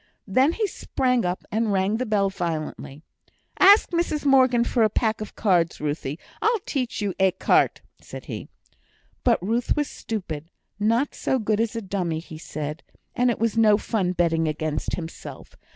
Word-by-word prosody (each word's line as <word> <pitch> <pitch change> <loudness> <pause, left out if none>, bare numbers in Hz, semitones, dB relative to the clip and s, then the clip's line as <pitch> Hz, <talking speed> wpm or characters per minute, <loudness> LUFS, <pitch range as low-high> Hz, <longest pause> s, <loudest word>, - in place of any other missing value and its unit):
Then 260 - +3
he 440 - 0
sprang 250 - 0
up, 180 +1 -2
and 220 0 0
rung 195 +2 +1
the 255 +1 -2
bell 200 -2 +1
violently. 160 -5 -5 0.6
"Ask 400 +2 +7
Mrs 335 -4 -1
Morgan 260 -3 +5
for 240 0 0
a 215 - +5
pack 220 +1 0
of 215 - -7
cards. 175 -6 +1
Ruthie, 145 -1 -3 0.2
I'll 460 +1 +3
teach 250 -6 -2
you 200 -2 -1
écarté," 190 -1 +2 0.2
said - - -10
he. - - -6 0.8
But 240 -2 +3
Ruth 230 +4 0
was 295 -1 0
stupid, 165 -8 -6 0.3
not 230 +6 +1
so 265 - 0
good 215 -2 0
as 230 0 0
a 230 - -3
dummy, 185 -4 -2
he 160 -1 -9
said; 155 0 -5 0.3
and 245 0 +3
it 240 - 0
was 230 -1 0
no 215 -2 +5
fun 195 -5 -1
betting 165 -2 +1
against 155 0 -2
himself. 165 -2 -9
210 Hz, 170 wpm, -24 LUFS, 170-240 Hz, 0.8 s, Ask